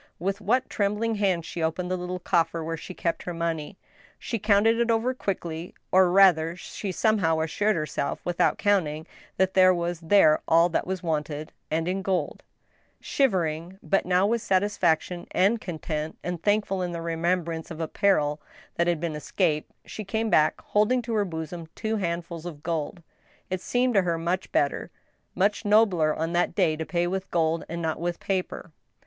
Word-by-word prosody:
With 195 +4 -2
what 250 +6 +1
trembling 210 +3 0
hands 190 -6 0
she 170 - -5
opened 170 +3 -1
the - - +1
little 180 0 -4
coffer 170 -2 0
where 165 +1 -3
she 180 +3 -9
kept 170 - -2
her 175 - -5
money! 165 +1 -3 0.4
She 230 - -4
counted 215 +2 +3
it 235 0 +1
over 230 +3 +2
quickly, 175 -7 -4 0.2
or, 185 -1 +5
rather, 175 -3 +5
she 190 +2 -6
somehow 185 -5 +2
assured 205 +7 +1
herself 155 -3 -2
without 175 -1 +1
counting, 160 -7 +1 0.3
that 190 0 +2
there 185 -1 +6
was 170 -1 -2
there 165 -2 +4
all 165 +2 +5
that 170 - -1
was 185 -1 -3
wanted, 155 -2 -3 0.2
and 160 +1 -1
in 190 +2 -1
gold 190 -1 -1
I - - -43 0.5
Shivering, 180 - 0
but 195 -3 +1
now 180 +1 +3
with 230 +2 +1
satisfaction 185 -4 +1
and 215 +4 +3
content, 155 -2 -4
and 175 -1 -4
thankful 205 -2 +1
in 175 -1 -2
the 170 - -4
remembrance 170 0 -1
of 165 -2 -8
a 160 - -2
peril 150 -6 +1 0.4
that 170 - +2
had 170 -2 +1
been 165 -1 -2
escaped, 150 +1 -1
she 215 - -7
came 220 +2 -2
back, 155 0 +3
holding 225 +4 +1
to 230 0 -4
her 210 -2 +2
bosom 165 -1 -6
two 220 0 -2
handf 170 -3 -2
uls 170 -1 -8
of 150 -4 -8
gold. 165 +1 -3 0.5
It 185 -1 -2
seemed 245 +3 +1
to 200 - +5
her 170 -2 0
much 175 +3 -2
better, 140 - 0 0.5
much 200 +4 +1
nobler, 205 -8 +3
on 165 +2 -2
that 175 0 +1
day, 155 - +2
to 160 0 -5
pay 175 -1 0
with 190 +2 -3
gold 165 -1 +1
and 170 0 -4
not 160 -1 -1
with 175 0 -2
paper. 185 -2 -3
175 Hz, 185 wpm, -26 LUFS, 165-200 Hz, 0.5 s, there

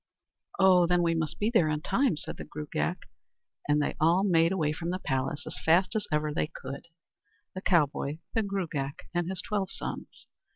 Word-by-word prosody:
"Oh! 185 -2 +6
then 175 0 +3
we 165 -1 +2
must 160 -2 -2
be 215 +2 0
there 175 -10 +4
in 155 0 -1
time," 240 - +1
said - - -6
the - - -6
Gruagach; 145 - -3 0.7
and 145 0 +4
they 145 - 0
all 170 +4 +4
made 165 -3 +4
away 155 -6 +1
from 170 +2 -4
the 180 - -1
place 135 -1 -2
as - - -6
fast 180 +6 +3
as 210 -1 -1
ever 150 0 0
they 150 - 0
could, 140 +1 -8 0.7
the 185 - -6
cowboy, 150 -5 +1 0.2
the 225 - +2
Gruagach, 170 -9 -3
and 175 0 0
his 190 - -3
twelve 205 -4 -1
sons. - - -7
170 Hz, 190 wpm, -29 LUFS, 150-190 Hz, 0.7 s, Oh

